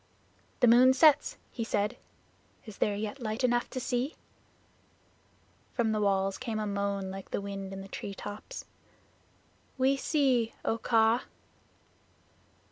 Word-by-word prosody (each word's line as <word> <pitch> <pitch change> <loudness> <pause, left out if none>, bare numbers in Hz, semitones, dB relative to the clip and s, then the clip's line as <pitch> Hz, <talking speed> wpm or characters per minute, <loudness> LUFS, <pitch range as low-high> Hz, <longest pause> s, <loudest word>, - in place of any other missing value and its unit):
"The 245 - +6
moon 250 +3 +7
sets," 300 0 +5
he 230 - -3
said. 210 -2 0 0.7
"Is 215 -3 -11
there 205 - +1
yet 215 +5 -4
light 220 +2 -3
enough 240 -1 +2
to 260 - -4
see?" 250 +3 -1 1.6
From 230 -3 +1
the 215 -1 0
walls 195 -1 +1
came 235 -4 -3
a 215 - -1
moan 200 -1 -2
like 195 0 -8
the - - -2
wind 195 -1 -6
in 195 0 -6
the 195 - -9
tree 200 0 -6
tops 210 - -7 1.1
"We 265 +1 +3
see, 265 -6 +1
O 225 - 0
Kaa." 225 +1 +3
220 Hz, 135 wpm, -30 LUFS, 200-250 Hz, 1.6 s, moon